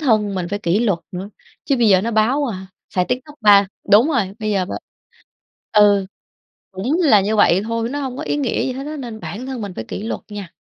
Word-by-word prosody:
thân 215 -8 +2
mình 180 -2 -2
phải 205 - -2
kỷ 180 +1 +1
luật 200 -8 +1
nữa, 185 +3 -5 0.4
chứ 275 - +1
bây 235 -3 +3
giờ 190 -2 +5
nó 230 +4 -2
báo, 235 +7 +2
à, 190 -4 -5 0.3
xài 180 -1 +2
TikTok 255 +6 -4
ba 205 -2 +6 0.2
đúng 225 +9 +6
rồi, 210 -10 0
bây 215 -1 -2
giờ 195 -3 +1
b - - -10 1.0
ừ, 205 -2 +5 0.7
cũng 250 - -1
là 215 -10 +6
như 215 +3 0
vậy 195 -2 +4
thôi, 230 +1 -2
nó 285 +1 -3
hông 260 -1 -4
có 305 - -4
ý - - -1
nghĩa 265 -5 0
gì 255 - -2
hết 270 +2 -6
á 305 0 -5
nên 235 -5 -7
bản 235 +5 -6
thân 260 -4 -5
mình 200 -3 -5
phải 110 - -4
kỷ 200 - -6
luật 225 - -4
nha. 200 -4 -8
215 Hz, 235 wpm, -20 LUFS, 195-255 Hz, 1.0 s, ba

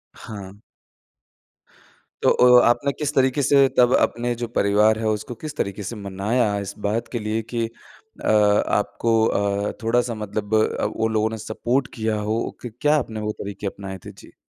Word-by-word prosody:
हाँ। 100 -2 -10 1.6
तो - - +5 0.3
अ, - - +4
आपने 140 +4 +2
किस 145 0 -3
तरीके 130 +1 +2
से 140 0 +5
तब 125 0 +5
अपने 120 +1 +1
जो 120 0 -4
परिवार 105 0 +2
है 110 - -1
उसको 110 +3 -3
किस 155 -1 -5
तरीके 100 -3 -3
से 100 +5 -5
मनाया 105 +2 -1
इस 100 0 -5
बात 115 +3 -1
के 120 - -2
लिए 110 +1 -2
कि 115 -1 0
अ, 115 - -12
आपको 105 +2 +2
अ, 100 -1 0
थोड़ा-सा 120 +1 +1
मतलब 105 0 -4
अ, 110 - +1
वो 110 - -1
लोगों 110 0 +1
ने 110 - -5
सपोर्ट 120 +4 -1
किया 110 -1 -1
हो 110 +1 +1 0.2
कि 120 - -6
क्या 150 +1 +4
आपने 115 -6 -3
वो 105 0 -2
तरीके 100 0 -5
अपनाए 95 -1 -6
थे? - - -7
जी। - - -17
110 Hz, 175 wpm, -22 LUFS, 105-120 Hz, 1.6 s, तो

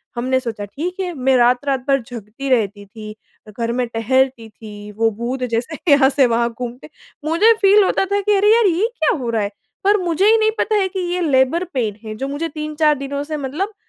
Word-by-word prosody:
हमने 255 +2 0
सोचा 225 -5 -5
ठीक 315 - -5
है, 365 -2 -3
मैं 265 -2 +1
रात-रात 250 +3 +2
भर 275 -1 +2
जगती 235 +3 -7
रहती 205 -5 0
थी, 215 +1 -10 0.3
घर 230 +2 -3
में 250 0 -1
टहलती 235 +1 0
थी, 210 -1 -11
वो 225 +2 +1
भूत 240 +4 -4
जैसे 245 +7 -2
यहाँ 280 -2 +6
से 275 -1 +3
वहाँ 235 0 +1
घूमते 245 0 -7 0.4
मुझे 340 +9 +4
फ़ील 405 +1 +6
होता 385 - +1
था 400 +1 0
कि 415 +1 +2
अरे 415 +2 +4
यार! 465 -1 +4
ये 370 +5 +1
क्या 315 - +2
हो 245 -2 -4
रहा 225 -2 0
है, 200 - -1 0.3
पर 405 +2 +4
मुझे 345 +2 +1
ही 450 - +5
नहीं 435 0 +2
पता 435 - +1
है 395 -2 +2
कि 380 - -5
ये 360 - -1
लेबर 280 +2 +2
पेन 220 -6 -2
है 215 0 -6
जो 270 +5 -4
मुझे 290 +4 -3
3-4 305 0 0
दिनों 280 +1 -4
से 305 +1 -5
मतलब 300 +10 -4
265 Hz, 215 wpm, -19 LUFS, 235-330 Hz, 0.4 s, यहाँ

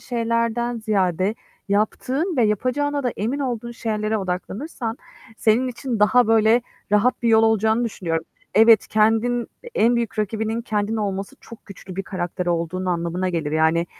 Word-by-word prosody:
Şeylerden 230 0 -1
ziyade, 195 -2 0 0.3
yaptığın 255 - 0
ve 240 - +4
yapacağına 265 +7 0
da 245 - 0
emin 235 +8 -2
olduğun 240 -4 -3
şeylere 220 -2 -2
odaklanırsan, 220 - -4 0.4
senin 230 +4 +2
için 245 -1 -4
daha, 245 +3 +5
böyle, 225 +2 +4 0.3
rahat 225 +6 +2
bir 235 - +2
yol 220 0 +5
olacağını 220 +1 +2
düşünüyorum. 165 -7 -3 0.3
Evet, 220 +1 +6
kendin 225 +3 +2 0.3
en 235 +2 +3
büyük 230 -2 -3
rakibinin 220 +2 -1
kendin 215 -1 -1
olması 195 -2 -3
çok 230 - -14
güçlü 190 -2 -11
bir 195 - -2
karakter 180 -1 -4
olduğun 170 +1 -1
anlamına 175 +1 -1
gelir. 160 -4 -2
Yani 160 +2 +2
220 Hz, 145 wpm, -22 LUFS, 190-235 Hz, 0.4 s, Evet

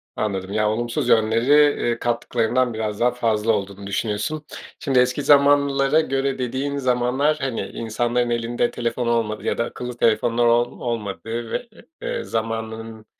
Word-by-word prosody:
Anladım. 100 -2 -3
Ya, 105 0 +2
olumsuz 120 +4 -1
yönleri, 115 +2 +3 0.3
eee, 120 -1 0
kattıklarından 120 +1 0
biraz 110 -2 -3
daha 125 +1 +3
fazla 115 -2 +1
olduğunu 100 -1 -3
düşünüyorsun. 110 +10 -2 0.3
Şimdi 135 -3 +2
eski 125 +3 +2
zamanlara 140 +1 +4
göre 135 -2 -1
dediğin 130 +3 -2
zamanlar, 130 +3 +1
hani, 130 -3 -2
insanların 120 +2 -1
elinde 120 0 0
telefon 120 0 -2
olmadığı 115 -2 0
ya - - -1
da - - +1
akıllı 125 0 -7
telefonlar 115 +1 +2
ol 120 +1 +2
olmadığı 115 0 -4
ve, 240 - -3 0.3
eee, - - -3
zamanının, 110 0 -4
120 Hz, 140 wpm, -22 LUFS, 110-130 Hz, 0.3 s, zamanlara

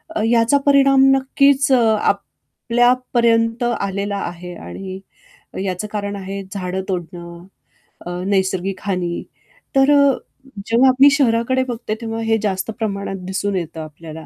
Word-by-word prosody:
अ, - - 0
याचा 235 +4 +3
परिणाम 275 -1 +5
नक्कीच 275 +1 +2
अ, 255 - +5 0.2
आपल्यापर्यंत 240 -1 0 0.2
आलेला 200 +1 -2
आहे 175 0 -9
आणि 190 0 -8 0.6
याचं 190 +2 -3
कारण 205 -1 -3
आहे 195 0 -6
झाडं 190 -1 -3
तोडणं, 175 -1 -6 0.6
अ, 175 - -5 0.2
नैसर्गिक 190 -1 0
हानी. 180 -4 -2 0.5
तर 270 +2 +5
अ, 280 -1 +5 0.5
जेव्हा 250 +3 +5
मी 285 +1 +9
शहराकडे 260 -1 +2
बघते, 230 -3 -4
तेव्हा 225 0 -4
हे 225 0 +1
जास्त 190 +1 -1
प्रमाणात 200 -2 -3
दिसून 195 +1 -2
येतं 165 -2 -5
आपल्याला. 155 0 -10
205 Hz, 125 wpm, -19 LUFS, 185-245 Hz, 0.6 s, मी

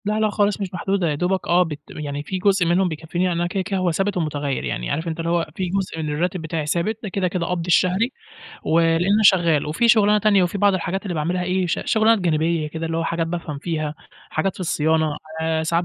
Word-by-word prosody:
لأ 210 +1 0
لأ 215 -1 +2
خالص 205 0 0
مش 190 -2 -4
محدودة 185 -1 0
يا 150 - 0
دوبك 180 +5 -1
آه 175 +1 +4
بت 150 -4 -6
م - - -9
يعني 145 -1 -4
في 185 +5 -4
جزء 195 -1 +2
منهم 180 +3 +2
بيكفيني، 165 +2 -3
يعني 175 -2 0
أنا 175 - +1
كده 190 +2 -2
كده 195 +1 -2
هو 180 -1 +1
ثابت 195 +3 -1
ومتغيّر 145 -4 -2
يعني، - - -3
عارف 160 +2 -2
أنت 165 0 -4
اللي 165 0 -2
هو 170 -1 +1
في 185 - -2
جزء 190 -3 -2
من 155 - -3
الراتب 175 +4 -1
بتاعي 160 -1 -3
ثابت، 175 +8 -1
ده 210 - -4
كده 185 0 0
كده 180 -1 -2
قبضي 175 -1 -2
الشهري، 185 +7 +2 0.5
ولإمّا 170 +6 +3
شغال، 170 -7 +4
وفي 230 +11 +1
شُغلانة 210 -2 +5
تانية 205 -2 +4
وفي 180 +3 -1
بعض 200 0 +4
الحاجات 185 +2 -2
اللي 190 -4 -4
باعملها 170 +4 -1
إيه، 185 0 0
ش 170 - -1
شُغلانات 220 0 +3
جانبية 165 -2 0
كده، 160 +2 -4
اللي 165 0 -2
هو 165 - -1
حاجات 165 0 -1
بافهم 165 -4 -4
فيها، 155 -1 -3 0.4
حاجات 195 -1 -1
في - - -11
الصيانة، 160 -3 +1 0.2
آآ، 160 0 0
ساعات 170 +2 0
175 Hz, 240 wpm, -22 LUFS, 160-190 Hz, 0.5 s, شُغلانة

